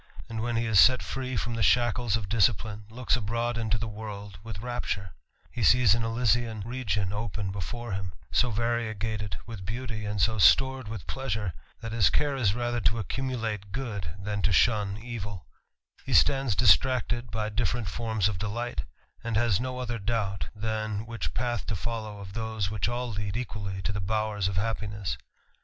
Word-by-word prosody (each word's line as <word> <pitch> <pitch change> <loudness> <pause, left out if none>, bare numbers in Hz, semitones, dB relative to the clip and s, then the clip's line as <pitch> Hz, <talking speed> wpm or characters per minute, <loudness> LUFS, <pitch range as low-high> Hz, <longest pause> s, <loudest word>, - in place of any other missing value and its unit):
and 115 -1 -4
when 120 0 -1
he 115 +1 +1
is 110 -4 +5
set 130 +6 +7
free 130 -2 -3
from 120 +2 -1
the 115 - -2
shackles 120 +4 +3
of 105 -4 -5
disciplme, 110 0 +1
'"^iks 120 +3 +1
abroad 115 +1 -1
into 110 -2 0
the 115 +1 -3
world 105 -2 -7
with 110 -3 -6
rapture; 105 -4 -3 0.4
he - - -4
sees 125 -5 +6
an, 115 - +1
^lysian 115 -2 +1
region 110 -6 -1
open 105 -2 -3
before 110 +5 -4
him, 95 -1 -3 0.2
so 125 - +3
variegated 110 -4 -1
with 110 -5 -7
beauty, 110 +1 -4
&nd 105 - -3
so 110 +4 +2
stored 130 +4 +5
with 110 -4 -6
pleasure, 110 -8 -2 0.3
that 115 - -5
his 110 -5 +4
care 145 -2 +1
is 110 -6 +2
rather 120 0 -1
to 90 +2 +3
Sccuraulate 110 -2 -3
good, 105 - -4
than 100 +1 -3
to 100 - +2
shun 100 +2 +3
evil; 105 - -6 0.6
be - - -4
stands 115 - +4
distracted 120 +3 +4
by 110 0 -2
different 110 +1 0
forms 110 -1 0
of 100 -4 -2
delight, 105 - -2 0.4
and 115 -2 0
has 115 -5 +3
no 130 +1 -3
other 120 -2 -3
doubt, 100 -2 -1
titan 110 -1 -2
which 115 0 -4
path 120 -1 -1
to 110 - -1
follow 110 +1 -4
of 100 -1 -9
those 110 -3 -2
which 105 -1 0
all 120 0 -2
lead 105 +1 -3
equally 100 -6 -4
to 105 - 0
the 105 -1 -2
bowers 105 0 0
of 95 - -2
happiness. 105 -2 -2
110 Hz, 180 wpm, -28 LUFS, 100-120 Hz, 0.6 s, set